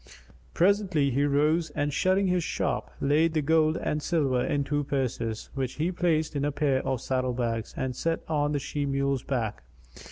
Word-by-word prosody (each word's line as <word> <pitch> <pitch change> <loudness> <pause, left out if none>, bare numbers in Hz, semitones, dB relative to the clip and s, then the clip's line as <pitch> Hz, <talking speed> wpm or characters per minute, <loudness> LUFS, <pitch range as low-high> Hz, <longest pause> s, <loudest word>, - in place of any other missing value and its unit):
Presently 185 -7 +2
he 140 +3 +2
rose 150 +3 +2
and 145 0 -1
shutting 190 +5 +2
his 180 -2 +1
shop, - - -2
laid 155 +4 +2
the 155 - +3
gold 160 +1 +3
and 150 - -2
silver 140 -7 +1
in 145 -1 0
two 145 +1 -1
purses, 125 -5 -3
which 130 -2 -2
he 165 +4 -1
placed 160 -4 0
in 140 - 0
a 145 - +1
pair 140 -2 +1
of 130 -3 -2
saddle 130 -1 -1
bags 115 -2 -2
and 130 -1 -2
set 165 +5 -1
on 150 -2 +1
the - - +1
she 145 +1 -3
mule's 140 -1 0
back. 115 - -2
145 Hz, 185 wpm, -27 LUFS, 130-160 Hz, -, the